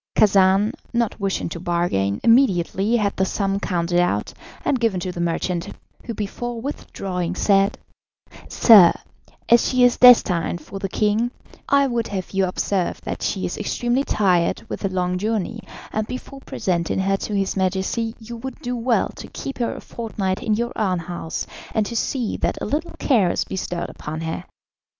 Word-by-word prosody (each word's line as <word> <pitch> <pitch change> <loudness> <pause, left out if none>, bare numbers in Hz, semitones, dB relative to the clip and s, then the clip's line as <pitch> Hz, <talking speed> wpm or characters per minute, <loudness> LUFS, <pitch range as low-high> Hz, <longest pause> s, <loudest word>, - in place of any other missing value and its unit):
Khacan, 195 0 +4 0.2
not 235 -2 0
wishing 195 -1 -1
to 170 - -6
bargain, 170 - 0
immediately 220 -3 +3
had 205 -3 +1
the 190 - +2
sum 195 +1 -1
counted 175 -2 0
out, 175 0 0 0.3
and 265 - +2
given 225 -6 +1
to 185 - -3
the 175 - -5
merchant, 170 +1 -1 0.4
who 230 - -5
before 230 +4 -4
withdrawing 185 - -4
said: 195 +1 +3 0.7
"Sir, 205 -7 +8 0.5
as 235 0 +5
she 255 -1 +3
is 245 -1 +5
destined 185 -9 +6
for 195 +5 -8
the 195 0 -3
king, 215 +4 +1 0.4
I 280 0 +5
would 235 -3 -1
have 190 -3 -5
you 195 -1 +1
observe 185 0 -1
that - - -5
she - - -1
is - - -4
extremely 245 +3 0
tired 185 -9 +1
with - - -5
the 195 - -1
long 180 -1 -1
journey, 220 +1 -2 0.3
and 215 0 -1
before 255 +2 -7
presenting 175 -9 -2
her 195 +1 +1
to 210 - -4
his 195 -1 -1
Majesty 190 +4 -1
you 235 +1 -9
would 260 +2 -7
do 245 0 -3
well 235 0 +1
to - - -8
keep 275 - -7
her 235 - -1
a - - -8
fortnight 200 -5 -3
in 215 - +1
your 235 +2 -2
own 190 -4 0
house, 170 -1 -5 0.3
and 220 -2 +2
to 235 - -5
see 235 0 -1
that - - -1
a - - -3
little 305 +9 -2
care 220 -10 +3
is - - 0
bestowed 180 -2 -4
upon 155 +1 -6
her. 165 +2 -4
200 Hz, 175 wpm, -22 LUFS, 180-235 Hz, 0.7 s, Sir